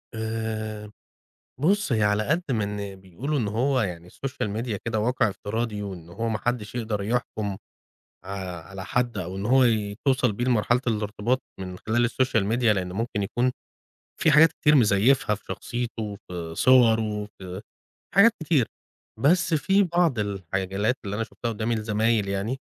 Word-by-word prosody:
آآ 110 -1 -4 0.7
بُص، 200 +1 +2
هي 110 -2 +2
على 105 +1 +2
قد 160 +6 +2
ما 110 -4 +1
إن 100 -1 -4
بيقولوا 95 - -4
إن 110 - 0
هو 125 +4 +1
يعني 90 -3 -4
الSocial 135 -2 -4
Media 115 -4 -3
كده 110 -2 0
واقع 120 0 +2
افتراضي 105 +1 -3
وإن 90 -4 -7
هو 115 +6 -3
ما 110 - 0
حدّش 120 -3 -2
يقدر 110 -4 -2
يحكُم 105 -3 -2 0.7
ع - - -9 0.4
على 95 -1 -7
حد 120 +2 0
أو 90 +1 -4
إن 100 - -4
هو 130 +2 +5 0.4
توصل 130 -4 +3
بيه 120 +4 -2
لمرحلة 120 +1 +2
الارتباط 110 +3 0 0.2
من 90 -1 -6
خلال 120 +4 +1
الSocial 125 -6 +1
Media، 125 - -3
لإن 95 -5 +2
ممكن 105 +1 -2
يكون 125 +5 0 0.7
في 155 - +4
حاجات 160 +2 +7
كتير 150 0 +3
مزيّفها 110 -1 +4
في 100 - -13
شخصيته، 115 -4 -4
في 85 -2 -6
صوره، 110 -5 +4
في 95 0 -7 0.5
حاجات 225 +3 +7
كتير. 145 -7 +2 0.5
بس 170 +4 +3
في 190 +7 +3
بعض 170 - +2
الحالات 95 +2 -1
اللي 100 0 -3
أنا 115 - -1
شُفتها 115 +1 -5
قُدّامي 115 +1 -1
لزمايل 110 -1 +1
يعني 100 +7 -2
110 Hz, 160 wpm, -25 LUFS, 100-125 Hz, 0.7 s, حاجات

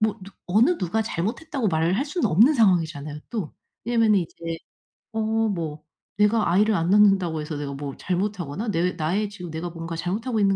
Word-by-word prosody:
뭐 215 -1 0
누 195 - -10 0.2
어느 230 - +4
누가 185 +5 -1
잘못했다고 225 - -2
말을 165 +3 +1
할 270 - 0
수는 300 - -1
없는 225 - +6
상황이잖아요 160 - +1
또. 210 -9 -4 0.3
왜냐면은 225 -3 +3
이제 165 -1 -5 0.6
어 220 - -1 0.3
뭐 160 -6 -4 0.3
내가 210 -2 +3
아이를 210 +4 +3
안 165 -1 0
낳는다고 195 -6 +4
해서 150 0 -5
내가 145 -1 -4
뭐 140 -1 -6
잘못하거나 185 0 -2
내 180 -1 +1
나의 190 +7 -1
지금 180 -4 -8
내가 160 +2 -4
뭔가 165 0 -6
잘못하고 215 +7 -2
있는 195 -1 +3
185 Hz, 385 characters per minute, -24 LUFS, 165-215 Hz, 0.6 s, 없는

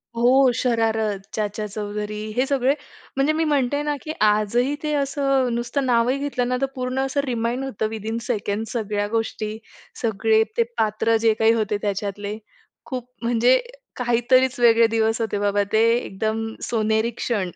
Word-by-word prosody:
हो, 255 +2 +5
शरारत, 225 -4 0
चाचा 210 0 -2
चौधरी 210 0 -5 0.2
हे 255 +2 +2
सगळे 270 0 +2 0.4
म्हणजे 275 +3 +2
मी 320 +1 +1
म्हणते 285 -2 +1
ना, 295 0 -1
की 310 - -4 0.2
आजही 215 +6 +2
ते 300 0 -1
असं 275 -3 +1
नुसतं 240 +4 -1
नावही 245 +1 +2
घेतलं 275 -3 -1
ना 250 0 0
तर 275 - +3
पूर्ण 255 0 -2
असं 275 +1 0
रिमाइंड 240 0 -1
होतं 220 -5 -2
विथिन 220 +1 -4
अ - - -10
सेकंड 210 -3 -2
सगळ्या 210 -3 -2
गोष्टी, 220 -1 -2 0.4
सगळे 220 0 +2
ते 235 - +5
पात्र 220 +1 +1
जे 225 - +6
काही 225 0 +5
होते 215 -2 0
त्याच्यातले, 205 +1 -3 0.5
खूप 250 -3 -6
म्हणजे 240 +2 +3 0.4
काहीतरीच 250 +1 +2
वेगळे 230 -1 +6
दिवस 225 0 +1
होते 215 -2 -1
बाबा 205 0 +1
ते, 220 +1 +4
एकदम 220 0 -2 0.2
सोनेरी 220 0 +1
क्षण. 200 -7 -1
230 Hz, 155 wpm, -23 LUFS, 215-255 Hz, 0.5 s, जे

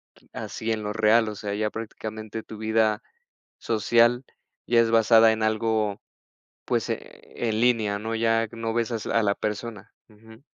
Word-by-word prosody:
r - - -24
así 115 +1 -4
en 110 - -4
lo 105 - -3
real, 110 +1 +3
o 105 - -6
sea, 100 0 -4
ya 105 +1 -1
prácticamente 110 0 -7
tu 110 - -10
vida 110 0 +1 0.6
social 120 +3 +2 0.4
ya 120 -1 +4
es 115 0 +1
basada 115 0 +6
en 110 0 -1
algo, 110 -1 0 0.6
pues, - - -1
eh, - - -1 0.5
en 110 0 0
línea, 110 -4 +2
¿no? 110 +2 -4
Ya 115 0 +1
no 115 -1 -4
ves 120 0 -1
a - - -1
s 110 - -7
a 115 - +2
la 100 -1 +1
persona. 105 -1 -5 0.2
Ujú. 110 +3 -17
110 Hz, 175 wpm, -25 LUFS, 105-115 Hz, 0.6 s, basada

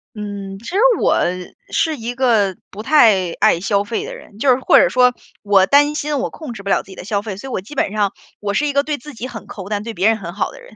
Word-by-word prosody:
嗯， 200 -2 -6
其 230 - -15
实 365 - -4 0.2
我 - - +3 0.5
是 320 -2 0
一 235 0 -5
个 225 -7 +2 0.2
不 210 +2 -8
太 220 - +4
爱 - - +4
消 200 +1 +1
费 220 +2 -3
的 - - -7
人， 205 - -14
就 265 +4 +3
是 250 - +5
或 - - +4
者 - - +4
说 250 -1 +4 0.3
我 200 -2 +4
担 290 +7 +4
心 295 -1 -2
我 - - -1
控 310 -6 -8
制 200 -4 -9
不 200 - -6
了 - - +2
自 - - -24
己 - - -9
的 - - -9
消 200 +2 -2
费， 205 -3 -6
所 270 - -8
以 - - -7
我 185 - -2
基 225 - -11
本 235 - 0
上 205 -2 0 0.3
我 205 -1 -3
是 295 +8 +1
一 285 - -2
个 280 - +3
对 295 0 -3
自 295 +4 -11
己 240 +2 -6
很 235 -4 -9
抠， 195 -1 -9
但 205 -1 -1
对 225 0 -6
别 200 - +2
人 225 - +2
很 175 -4 -7
好 205 - -1
的 - - -13
人， - - -16
220 Hz, 305 characters per minute, -19 LUFS, 200-270 Hz, 0.5 s, 是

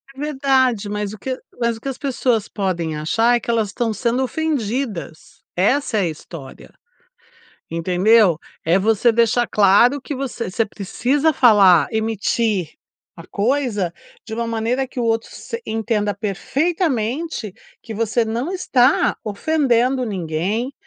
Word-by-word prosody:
É - - -13
verdade, 265 -7 +1
mas 210 -1 -3
o - - -9
que 260 +5 -4 0.2
mas 235 -1 +1
o - - -16
que 275 - -4
as 265 - -5
pessoas 250 -5 0
podem 170 -5 -2
achar, 225 +11 +2
é - - +1
que - - -8
elas 225 -3 0
estão 225 +3 -2
sendo 240 +4 0
ofendidas, 250 - -3
essa 225 +5 +1
é - - +2
a 180 - +1
história, 155 -3 -10 1.0
entendeu? 180 +2 +3 0.3
É 170 +3 +3
você 220 +3 +3
deixar 235 +1 +2
claro 210 +7 +4
que 285 - -5
você 255 -6 -4
você 225 +4 +1
precisa 255 +9 0
falar, 195 - +6
emitir 220 -4 0 0.5
a 165 - -11
coisa 215 -5 -1 0.3
de 220 - -10
uma 235 0 -2
maneira 230 +4 -1
que 255 - -9
o 240 - 0
outro 225 0 0
se 465 - -7
entenda 220 -2 -1
perfeitamente 255 - -2 0.3
que 230 - -8
você 225 +2 0
não 235 +8 -3
está 270 -8 +2
ofendendo 255 +2 +1
ninguém, 195 - -2
225 Hz, 145 wpm, -20 LUFS, 200-255 Hz, 1.0 s, falar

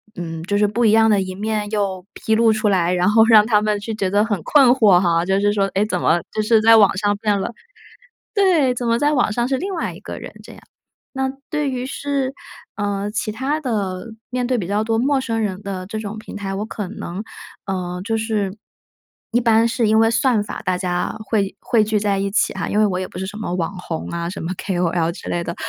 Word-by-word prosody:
嗯， 165 -2 -5
就 205 +3 -1
是 210 - +3
不 235 +4 0
一 220 - +5
样 225 0 +5
的 205 -2 +3
一 185 0 -5
面 210 0 -2
又 195 -4 -2
披 220 - -1
露 225 0 +4
出 215 0 0
来， 180 -3 +2
然 180 +3 +2
后 220 0 +6
让 215 -2 +7
他 210 -2 +3
们 210 -1 0
就 220 +2 -5
觉 195 -3 -1
得 205 +2 +2
很 205 -7 -2
困 275 - +5
惑 215 -8 +5
哈， 170 -2 +2
就 190 +2 +1
是 205 0 +2
说， 200 -1 +2
诶， 205 +2 +2
怎 - - -2
么， 170 - +3
就 215 - -1
是 220 +1 +4
在 225 0 +7
网 205 -3 +5
上 205 0 +1
变 205 -1 0
了。 195 - -3 0.8
对， 345 -11 +3
怎 240 -1 -3
么 230 0 +2
在 295 +2 +2
网 245 -6 +2
上 240 +2 0
是 265 +1 0
另 390 +5 -4
外 - - -3
一 - - -12
个 - - -7
人 - - -9
这 - - -13
样。 - - -14 0.6
那 265 0 0 0.2
对 300 -3 -1
于 255 0 -3
是 275 -1 -2 0.4
呃， 205 -1 -2
其 215 0 -2
它 270 +8 -2
的 200 -7 -3 0.2
面 250 0 -1
对 255 - +1
比 185 - -3
较 205 +2 0
多 225 0 0
陌 270 +2 +2
生 225 -3 -2
人 200 -2 -3
的 190 -2 -5
这 215 +3 -5
种 215 0 -6
平 - - -10
台， 200 -1 -4
我 210 +2 -3
可 205 -4 -5
能， 195 -1 -6 0.4
呃， 180 -2 -3
就 225 0 -1
是， 215 -3 -2 0.7
一 240 +2 +2
般 230 0 +4
是 230 0 0
因 220 +1 +4
为 225 0 +4
算 235 -2 +2
法 205 - -7
大 185 -1 +1
家 180 +2 -2
会 205 -3 -1
汇 235 - 0
汇 215 - +5
聚 210 -1 0
在 200 -2 0
一 195 0 -2
起 - - +2
哈， - - -3
因 210 - +1
为 215 - +5
我 185 -2 -1
也 185 - -3
不 - - -14
是 190 - -3
什 210 - -8
么 180 -5 -3
网 180 +1 -3
红 165 -2 -5
啊， 170 0 -3
什 190 - -6
么 165 +3 -3
kol 175 -3 -1
之 - - -9
类 170 0 -2
的， 170 - -4
210 Hz, 270 characters per minute, -20 LUFS, 190-230 Hz, 0.8 s, 让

